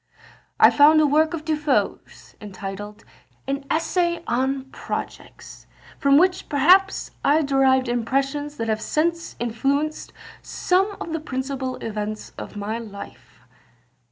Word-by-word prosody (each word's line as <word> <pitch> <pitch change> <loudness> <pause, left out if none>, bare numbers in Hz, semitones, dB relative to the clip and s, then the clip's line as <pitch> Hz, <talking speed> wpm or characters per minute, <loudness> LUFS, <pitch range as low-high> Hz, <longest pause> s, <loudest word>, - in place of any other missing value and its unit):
"I - - +8
found 300 +2 +6
a 310 - +5
work 310 +3 +2
of 305 -2 -8
De 315 -1 +1
Foe's, 300 -2 -2
entitled 205 +1 -8 0.4
an 275 +1 -3
'Essay 340 +1 0
on 265 +2 0
Projects,' - - -7 0.3
from 280 0 +5
which 365 +3 +2
perhaps 365 +8 +3
I 305 +3 +3
derived 265 -2 +3
impressions 275 +5 -1
that 225 - -3
have 220 -1 -1
since 335 +5 -1
influenced 275 +6 -1 0.3
some 390 +3 0
of 330 - -5
the 325 - -1
principal 260 -2 -4
events 215 -1 -5
of - - -8
my 210 +3 -3
life." 205 -3 -11
275 Hz, 130 wpm, -23 LUFS, 240-310 Hz, 0.4 s, I